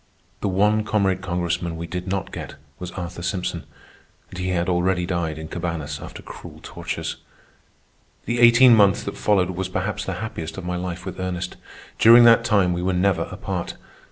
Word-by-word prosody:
The - - -2
one 105 +3 +2
comrade 95 -4 +1
Congressman 85 -2 -2
we 85 - -5
did 90 +2 -5
not 95 0 -3
get - - -7 0.2
was 90 - -5
Arthur 90 -1 -6
Simpson, 90 +1 -3 0.7
and 90 - -8
he 90 0 -2
had 90 -1 0
already 90 0 +1
died 85 -3 -2
in 80 0 -7
Cabañas 80 -4 -4
after - - -9
cruel - - -11
tortures. - - -5 1.1
The 120 0 -1
eighteen 120 +1 +7
months 100 -3 +4
that 100 - -5
followed 95 -3 +2
was 95 +1 -4
perhaps - - -2
the - - -3
happiest 85 -7 -6
of 95 - -6
my 90 0 -2
life 90 0 -5
with - - -6
Ernest. 90 -1 -3 0.4
During 115 +2 +8
that 115 0 +7
time 100 -7 +2
we 85 - -2
were 95 +1 0
never 90 -2 +1
apart. - - -4
90 Hz, 180 wpm, -23 LUFS, 85-100 Hz, 1.1 s, During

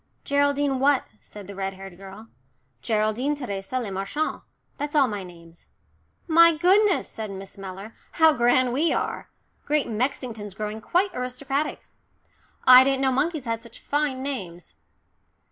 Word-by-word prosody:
"Geraldine 285 -1 +1
what?" 275 0 +3 0.2
said 205 -1 -12
the 200 - -9
red 195 0 -4
haired 195 -1 -10
girl. 195 +4 -12 0.5
"Geraldine 220 - 0
Theresa 235 -2 -4
Le 220 -5 -4
Marchant 195 +11 -3 0.4
that's 290 +1 -4
all 280 -3 +5
my 205 -3 -4
names." 170 -2 -15 0.6
"My 335 0 +6
goodness," 385 +4 +3
said 220 -1 -6
Miss 195 0 -9
Mellor, 195 +3 -9 0.2
"how 320 -1 +5
grand 245 0 +3
we 305 +5 +2
are! - - -3 0.4
Great 295 -1 +1
Mexington's 225 -3 -3
growing 215 +1 -5
quite 370 - +1
aristocratic. 270 +4 -3 0.8
I 255 0 +10
didn't 270 0 +1
know 265 -1 +2
monkeys 300 +2 -1
had 230 -1 -2
such 230 0 -14
fine 285 -3 -1
names." 180 - -6
250 Hz, 145 wpm, -24 LUFS, 200-285 Hz, 0.8 s, I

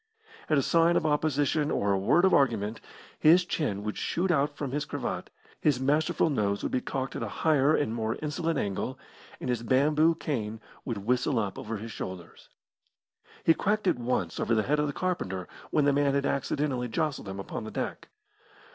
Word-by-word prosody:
At 155 - +4
a 140 - +3
sign 170 +1 +4
of - - 0
opposition 150 0 +1
or 100 -8 +1
a 95 - +2
word 155 - +4
of 190 - +4
argument 115 -5 +2 0.4
his 175 +4 +6
chin 105 - -2
would 105 0 -4
shoot 180 +2 0
out 145 -2 +1
from 140 -3 -3
his 145 +1 -1
cravat, - - -4 0.3
his 145 -5 +2
masterful 150 +4 +2
nose 100 -6 0
would - - -2
be 125 - 0
cocked 135 -1 -4
at - - -4
a - - -2
higher 155 -1 +3
and 115 -6 0
more 115 -1 -1
insolent 155 +1 -1
angle, 100 -6 -2 0.4
and - - -5
his 120 -2 0
bamboo 150 +7 +3
cane 115 -9 -3 0.3
would 120 -5 -3
whistle 125 +2 +1
up 105 -3 -2
over 110 +1 -4
his 110 +2 -7
shoulders. 90 -4 -8 0.9
He 165 - +6
cracked 210 +5 0
it 180 - +2
once 115 -9 -1
over 115 - +1
the 110 - +2
head 150 +5 +1
of 150 - +1
the - - -1
carpenter 95 - -3 0.2
when 150 -2 +2
the 145 - +4
man 140 0 +2
had 140 0 +1
accidentally 140 -2 -1
jostled 140 -3 -2
him 95 +1 -6
upon 95 - -5
the 110 - -6
deck. - - -4
140 Hz, 195 wpm, -28 LUFS, 110-155 Hz, 0.9 s, his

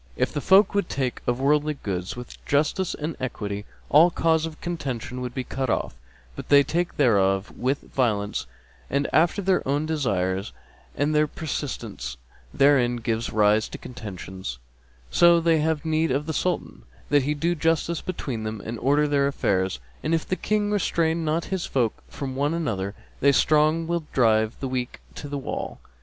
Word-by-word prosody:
If - - 0
folk 190 +8 +4
would 200 -3 0
take 130 -3 -2
of 120 +1 +1
worldly 150 +2 +2
goods 95 -7 -4
with 125 0 -10
justice 155 +6 +1
and 155 +1 -4
equity, 105 -5 -4 0.2
all 160 +4 +6
cause 165 -1 +1
of 155 -1 -10
contention 130 -7 -4
would 125 -1 -5
be 130 - -2
cut 130 +1 -3
off; - - 0 0.4
but - - -8
they 140 0 +7
take 170 +5 -2
thereof 100 -6 +3
with 135 +3 -1
violence 105 -6 -1 0.4
ant 140 +1 +1
after 175 +5 +3
their 190 0 +3
own 145 +3 +1
desires, 100 - -1 0.4
and 145 +2 +1
their 150 0 +3
persistence 115 - -5 0.3
therein 135 -4 +4
giveth 115 -1 -2
rise 105 +1 +3
to - - -7
contentions; 95 - -7 0.5
so 170 - +6
they 165 -1 +3
have 160 0 0
need 160 0 +1
of 140 +3 0
the 160 - -3
Sultan, 180 +3 -2 0.3
that 145 -1 +4
he 145 +3 -1
do 165 +4 +1
justice 165 0 0
between 135 -10 -4
them; 110 0 -4
and 115 0 -5
order 145 +3 +3
their 140 -1 +2
affairs; 95 - 0 0.2
and, 160 +2 +1
if 160 - -3
the 185 - 0
King 210 +1 0
restrain 170 -5 +1
not 160 +2 0
his 185 -3 -2
folk 120 -5 0
from 135 -2 -5
one 145 +4 0
another, 100 - -2 0.2
the 140 - +5
strong 155 +3 +3
will 170 -1 -2
drive 110 -3 +3
the 135 - -1
weak 125 -1 -3
to 145 - -8
the 145 - -3
wall. 135 - -5
140 Hz, 175 wpm, -25 LUFS, 115-160 Hz, 0.5 s, they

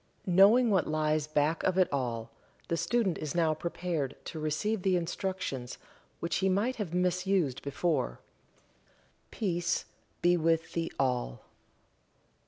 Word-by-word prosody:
Knowing 205 +6 +6
what 190 -4 +2
lies 155 -1 0
back 155 +1 +1
of 185 -1 +1
it 185 -2 +5
all, 115 -4 -2 0.4
the 170 - +1
student 205 0 0
is 155 -1 -4
now 165 -2 +3
prepared 160 -3 -3
to 160 - -6
receive 180 +8 -1
the 185 0 +2
instructions 175 -7 -3 0.4
which 170 -1 -1
he 190 - +2
might 210 +7 +1
have 205 -7 -3
misused 180 -5 +1
before. 140 - -1 1.1
Peace 175 -4 -1 0.4
be 175 0 +5
with 165 -1 +1
thee 165 -1 -1
all. 125 - -1
170 Hz, 130 wpm, -30 LUFS, 150-185 Hz, 1.1 s, Knowing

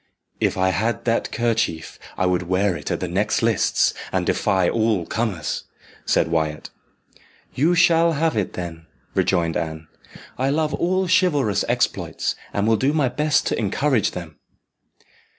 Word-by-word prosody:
"If - - 0
I 95 0 +2
had 110 +5 -1
that 115 -1 0
kerchief 110 -9 -1 0.2
I 95 - +1
would 90 -1 0
wear 95 0 +2
it 75 - -6
at - - -2
the - - -1
next - - 0
lists, - - +2 0.2
and - - 0
defy 95 -2 +1
all 110 -6 +1
comers," 100 - -2 0.4
said - - +2
Wyat. 80 -2 -2 0.8
"You 160 +7 +2
shall 165 0 +4
have 160 +1 0
it, 105 -4 -1
then," 85 -2 -7 0.3
rejoined 85 -3 +1
Anne. 80 0 -5 0.5
"I 130 +1 +1
love 155 +1 0
all 185 +2 0
chivalrous 150 - +2
exploits, - - -1 0.2
and 100 - -1
will 110 -1 +4
do 135 +6 +1
my 145 -5 +2
best 150 +4 +1
to - - -1
encourage 115 +3 +1
them." 85 -4 -8
110 Hz, 150 wpm, -22 LUFS, 90-145 Hz, 0.8 s, shall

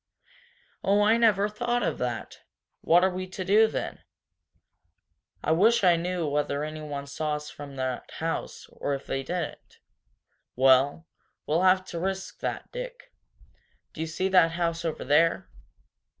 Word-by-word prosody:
"Oh, 205 +2 +3
I 220 +2 +4
never 210 -3 +3
thought 240 +3 -1
of - - -1
that! 120 -3 -4 0.4
What 175 +2 +4
are 190 - +4
we 185 +1 -5
to 185 0 -6
do, 215 +4 +5
then?' - - -4 1.4
"I - - +1
wish 210 +8 +4
I 175 -2 +6
knew 175 -1 -2
whether 145 0 -1
anyone 150 -2 -5
saw 150 +2 -2
us 150 0 -7
from 145 -1 -10
the 130 -1 -2
house 165 +1 -4
or 140 - -2
if 135 - -9
they 135 - -2
didn't! 170 +3 -5 0.8
Well, 135 +4 +4 0.4
we'll 160 +3 +1
have 185 0 +4
to 170 - -6
risk 190 +2 -4
that. - - -4
Dick, - - -8 0.8
do 160 - -7
you 160 - -2
see 170 +4 -1
that 180 -3 +5
house 170 -1 -1
over 165 -2 -3
there? 155 +5 +2
170 Hz, 150 wpm, -27 LUFS, 150-190 Hz, 1.4 s, I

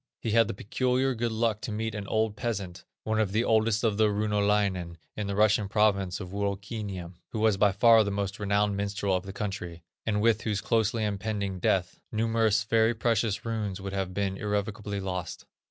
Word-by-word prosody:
He 115 - -2
had 115 0 +4
the - - -4
peculiar 130 +6 0
good 120 0 -1
luck 110 -1 0
to - - -4
meet 110 +1 -2
an 105 -2 -5
old 110 0 0
peasant, 100 -5 -4 0.2
one 110 0 0
of 105 -3 0
the 110 +2 +2
oldest 110 -1 +2
of 110 -3 +1
the 110 0 +4
runolainen 100 -4 0 0.2
in 105 -2 -3
the 100 - -2
Russian 105 -1 +3
province 100 -4 +2
of 95 - -6
Wuokiniem, 100 -2 -4 0.2
who 110 - -2
was 110 -1 +3
by 100 0 +4
far 110 +3 +6
the 100 - -2
most 100 0 -3
renowned 100 0 +1
minstrel 100 -1 -1
of 90 +1 -3
the - - -5
country, 95 -4 -5 0.2
and 105 -2 +1
with 110 0 +3
whose 105 -3 -1
closely 110 +2 +1
impending 100 -2 -2
death, 90 0 0
numerous 110 -1 +2
very 115 +1 +2
precious 115 -2 0
runes 105 -4 -2
would 100 0 -6
have 95 -2 -2
been 95 0 -2
irrevocably 105 0 -2
lost. 90 -3 -5
105 Hz, 190 wpm, -28 LUFS, 100-110 Hz, 0.2 s, far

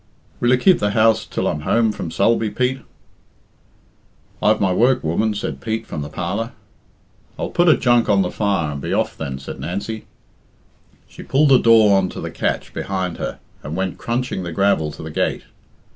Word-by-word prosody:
"Will 120 - +1
you 125 - +5
keep 180 +9 +4
the 105 0 0
house 110 0 +3
till - - -3
I'm 75 - -1
home 110 +8 +2
from 90 - -5
Sulby, 110 +6 +1
Pete?" 130 +4 -1 1.6
"I've 105 0 +3
my 95 -2 +2
work, 125 +6 +3
woman," 105 +7 0
said 100 - -4
Pete 110 0 -3
from 75 - -5
the 75 - -5
parlour. 90 +9 -3 0.8
"I'll - - -4
put 175 0 +3
a 155 - +6
junk 120 -2 +3
on 100 -2 +4
the 90 - -3
fire 100 -7 0
and 70 -1 -6
be - - -3
off - - 0
then," 65 -1 -5
said 70 - -8
Nancy. 105 +4 -5 1.0
She - - -12
pulled 145 +2 +2
the 130 -2 +7
door 110 -3 +6
on 95 -1 +2
to - - -8
the - - -5
catch - - -2
behind 95 -3 -3
her - - -4 0.2
and 75 +3 -6
went 95 0 -3
crunching 120 -4 -2
the 85 -2 -5
gravel 80 -4 +1
to - - -9
the 80 - -7
gate. - - -1
105 Hz, 190 wpm, -20 LUFS, 90-115 Hz, 1.6 s, the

